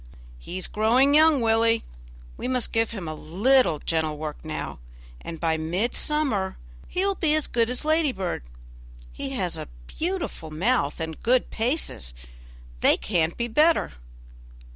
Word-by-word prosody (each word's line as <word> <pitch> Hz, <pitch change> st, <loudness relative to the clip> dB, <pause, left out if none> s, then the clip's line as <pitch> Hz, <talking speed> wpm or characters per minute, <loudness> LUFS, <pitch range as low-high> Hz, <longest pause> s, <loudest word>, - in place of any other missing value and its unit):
"He's 180 Hz, -, -4 dB
growing 245 Hz, +6 st, +3 dB
young, 310 Hz, -2 st, +6 dB
Willie; 225 Hz, 0 st, +3 dB, 0.5 s
we -, -, -5 dB
must 255 Hz, -2 st, +1 dB
give 225 Hz, 0 st, +1 dB
him 195 Hz, -7 st, -6 dB
a 155 Hz, -, -3 dB
little 190 Hz, -, +2 dB
gentle 160 Hz, 0 st, -1 dB
work 150 Hz, 0 st, -6 dB
now, 155 Hz, -, -5 dB, 0.4 s
and 165 Hz, -1 st, -7 dB
by 160 Hz, -1 st, +1 dB
mid 175 Hz, +9 st, -1 dB
summer 270 Hz, -11 st, 0 dB, 0.3 s
he 370 Hz, +2 st, -1 dB
will 400 Hz, -, +2 dB
be 315 Hz, -5 st, +1 dB
as 310 Hz, -, +1 dB
good 230 Hz, -1 st, +1 dB
as 250 Hz, +3 st, -2 dB
Ladybird. 290 Hz, -, 0 dB, 0.7 s
He -, -, -5 dB
has -, -, -2 dB
a -, -, -7 dB, 0.2 s
beautiful 340 Hz, -, -4 dB
mouth 170 Hz, -, 0 dB
and 160 Hz, -1 st, -5 dB
good 250 Hz, +2 st, +2 dB
paces; 225 Hz, -, -2 dB, 0.6 s
they -, -, +5 dB
can't 170 Hz, -4 st, 0 dB
be 235 Hz, -, -1 dB
better." 305 Hz, -, +3 dB
225 Hz, 145 wpm, -25 LUFS, 165-270 Hz, 0.7 s, young